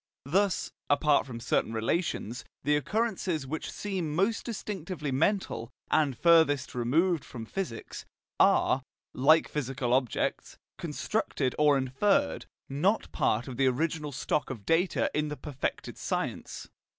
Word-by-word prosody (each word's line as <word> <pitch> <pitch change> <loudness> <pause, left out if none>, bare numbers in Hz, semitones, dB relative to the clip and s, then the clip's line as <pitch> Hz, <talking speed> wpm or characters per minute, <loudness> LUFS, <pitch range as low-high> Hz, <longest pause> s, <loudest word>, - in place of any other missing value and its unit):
Thus 190 +6 +1 0.2
(apart 145 0 +3
from 115 -3 -6
certain 115 -1 0
relations) 115 - -1 0.2
the 150 +2 +3
occurrences 185 - -1
which 155 +4 -4
seem 185 -7 -3
most 200 +6 +1
distinctively 185 - -4
mental, 135 - 0 0.2
and 145 -5 +2
furthest 160 -5 +4
removed 155 +8 +2
from 115 -3 -8
physics, 150 - -5 0.4
are, 135 - +4 0.3
like 155 +5 +5
physical 135 -3 -2
objects, 130 -3 0 0.2
constructed 130 - -1
or 150 -2 +5
inferred, 205 - +1 0.2
not 180 +11 0
part 115 +5 +1
of 125 -3 -6
the 135 0 +3
original 150 +3 -1
stock 145 +2 -1
of 110 -7 -7
data 170 - +2
in 150 0 0
the 150 0 -5
perfected 145 -3 -4
science. - - -3
150 Hz, 125 wpm, -29 LUFS, 130-175 Hz, 0.4 s, like